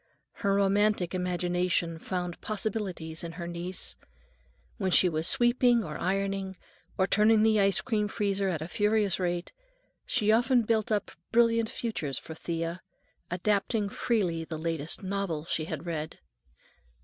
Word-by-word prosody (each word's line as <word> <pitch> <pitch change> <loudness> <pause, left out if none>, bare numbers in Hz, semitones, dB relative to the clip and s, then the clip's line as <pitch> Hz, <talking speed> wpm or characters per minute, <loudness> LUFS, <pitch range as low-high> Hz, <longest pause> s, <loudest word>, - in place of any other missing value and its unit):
Her 200 -1 +2
romantic 200 -2 +2
imagination 180 -2 0
found 180 -1 -4
possibilities 195 -7 -4
in 165 -1 -5
her 170 0 -6
niece. 175 +2 -4 0.8
When 190 -4 0
she 185 - +6
was 160 -1 0
sweeping 240 -1 +4
or 155 -4 -6
ironing, 195 0 -1 0.4
or 190 - +3
turning 215 +2 +4
the 220 -1 +4
ice 195 -1 +3
cream 215 -4 0
freezer 200 -1 0
at 160 -4 -2
a - - -6
furious 210 -1 +1
rate, 175 -1 -2 0.6
she 215 0 +2
often 240 +2 +4
built 220 -1 0
up 210 -2 0 0.2
brilliant 230 -1 +3
futures 160 - -2
for 160 - -7
Thea, 165 +2 -4 0.5
adapting 205 +3 0
freely 190 -8 0
the 160 0 -6
latest 160 +1 -2
novel 190 -5 -2
she 155 -1 -1
had 160 0 -5
read. 160 -2 -4
190 Hz, 140 wpm, -29 LUFS, 170-215 Hz, 0.8 s, she